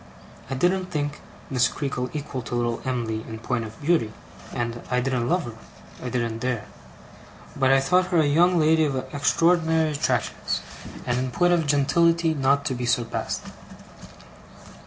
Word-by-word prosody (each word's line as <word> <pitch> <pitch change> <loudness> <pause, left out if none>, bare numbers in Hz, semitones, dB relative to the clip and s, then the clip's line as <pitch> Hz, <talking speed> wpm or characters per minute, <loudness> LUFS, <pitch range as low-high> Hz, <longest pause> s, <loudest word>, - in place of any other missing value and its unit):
I 135 - -2
didn't 180 +6 +1
think 145 -3 -3 0.3
Miss 125 -2 +3
Creakle 125 -3 -3
equal 145 -3 -4
to 120 - -5
little 120 -1 -1
Em'ly 115 -4 -2
in 110 -1 -6
point 115 0 -2
of 110 +1 -11
beauty, 150 -9 +2 0.4
and 120 0 -3
I 125 - +2
didn't 125 -2 -1
love 175 +1 +2
her 120 - -7 0.5
(I 125 - -3
didn't 115 -2 -2
dare); 120 -3 -2 0.9
but 135 -1 +3
I 135 - +6
thought 180 +7 +2
her 180 - +1
a 155 - +4
young 175 +5 +4
lady 160 +1 +4
of 140 -3 -1 0.2
extraordinary 160 +2 +2
attractions, 135 -5 -1 0.4
and 120 0 0
in 130 0 -1
point 175 +7 +2
of 165 -3 +1
gentility 165 +3 +3
not 140 0 +2
to 140 - 0
be 125 -1 -3
surpassed. 120 -1 -1
135 Hz, 160 wpm, -25 LUFS, 120-160 Hz, 0.9 s, I